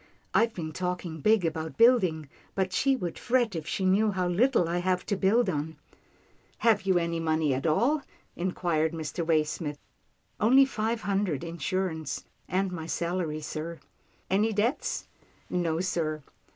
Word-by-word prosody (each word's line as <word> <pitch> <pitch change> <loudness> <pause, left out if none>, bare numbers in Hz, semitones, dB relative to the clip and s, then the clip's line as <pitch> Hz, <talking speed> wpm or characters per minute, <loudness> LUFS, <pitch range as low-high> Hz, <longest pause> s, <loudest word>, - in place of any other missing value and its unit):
" - - -38
I've 230 0 +3
been 160 -3 -4
talking 180 -1 -3
big 215 -1 +4
about 160 -3 -3
building, 185 - +4 0.3
but 190 -1 0
she 270 +6 +3
would 175 -9 -4
fret 240 -5 +1
if 160 -1 -4
she 190 - -1
knew 200 +4 +4
how 185 -3 0
little 200 +1 +3
I 175 +1 0
have 180 0 0
to 205 - 0
build 205 +5 +3
on." 160 -2 -2 0.8
"Have 205 -4 +2
you 190 -2 +4
any 170 -1 0
money 160 -3 +1
at 135 +5 -1
all?" 240 - +2 0.3
inquired 170 -3 0
Mr. 160 +1 -3
Waysmith. 155 -2 0 0.4
" 110 +5 -42
Only 260 +6 +6
five 225 -2 -2
hundred 195 -7 -1
insurance, 170 -2 -3 0.2
and 190 +1 0
my 165 -3 -5
salary, 170 -3 -2
sir." 160 +2 -5 0.5
"Any 210 +4 +2
debts?" 225 +8 0 0.5
"No 170 -2 0
sir." 155 -5 -1
180 Hz, 155 wpm, -28 LUFS, 160-205 Hz, 0.8 s, Only